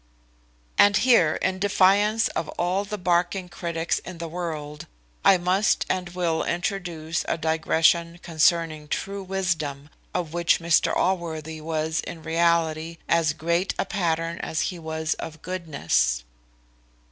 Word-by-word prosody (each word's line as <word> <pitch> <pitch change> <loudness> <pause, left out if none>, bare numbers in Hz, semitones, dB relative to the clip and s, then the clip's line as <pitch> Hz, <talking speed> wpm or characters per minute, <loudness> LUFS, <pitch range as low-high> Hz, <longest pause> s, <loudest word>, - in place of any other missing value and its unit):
And 205 0 +6
here, 220 -11 +4
in 185 0 0
defiance 205 +3 +3
of 165 - -3
all 185 +3 0
the 210 +1 -5
barking 180 0 0
critics 170 -1 -2
in 180 -1 -9
the 165 0 -5
world, 155 -3 -5 0.4
I 195 - +6
must 185 +4 +2
and 180 -1 -2
will 175 -2 -1
introduce 175 -3 -2
a - - 0
digression 160 +1 +2
concerning 160 -2 +1
true 195 +6 -3
wisdom, 165 -7 -2 0.2
of 165 -3 -3
which 170 -1 +3
Mr 170 -1 +3
Allworthy 160 -4 -2
was 160 0 -1
in 160 0 -6
reality 165 0 +1
as 165 -2 +2
great 170 +4 -1
a - - 0
pattern 170 -4 -1
as 160 - -2
he 175 - -9
was 160 -1 -2
of 160 -1 -8
goodness. 145 - 0
170 Hz, 135 wpm, -25 LUFS, 160-180 Hz, 0.4 s, And